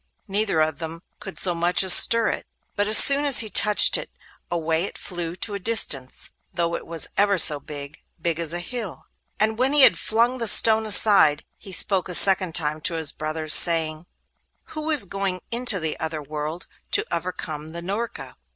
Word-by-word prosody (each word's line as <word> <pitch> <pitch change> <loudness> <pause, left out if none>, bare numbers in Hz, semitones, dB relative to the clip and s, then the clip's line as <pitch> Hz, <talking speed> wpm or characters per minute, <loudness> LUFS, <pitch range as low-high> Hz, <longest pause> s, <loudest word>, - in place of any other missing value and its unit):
Neither 200 -4 -1
of 155 -1 -3
them 165 0 -8 0.2
could 195 - -11
so 180 - -1
much 175 +2 0
as 190 - +7
stir 230 -1 +5
it, - - -6 0.3
but 205 0 -2
as 215 0 +5
soon 280 +1 +4
as 285 -3 +3
he 220 -2 -7
touched 210 0 +4
it, - - -10 0.4
away 165 0 -3
it - - -10
flew 175 -2 -6
to 205 +3 -5
a 200 - -6
distance, 180 - 0 0.2
though 170 -1 -3
it - - -9
was 165 -1 +2
ever 200 -1 +1
so 150 -3 +6
big—big 150 +3 -8
as 165 -2 -2
a 175 - -4
hill. 220 -1 -9 0.3
And 220 +1 -1
when 260 +3 0
he 295 -2 +4
had - - +4
flung 235 +3 -1
the 230 - -4
stone 220 0 +3
aside, 200 -8 +4
he 195 - -13
spoke 185 +1 0
a 180 - +1
second 185 -3 +3
time 155 -2 -2
to 170 - -2
his 160 -3 -1
brothers, 155 0 -3
saying: 160 -1 +3 0.7
'Who 310 0 -6
is 300 -9 +2
going 195 -1 -5
into 235 -4 0
the 160 -2 -3
other 160 -1 -6
world, 150 +3 -7 0.3
to - - 0
overcome 160 -3 -8
the 170 +1 -7
Norka? 205 +6 -7
180 Hz, 190 wpm, -21 LUFS, 160-215 Hz, 0.7 s, as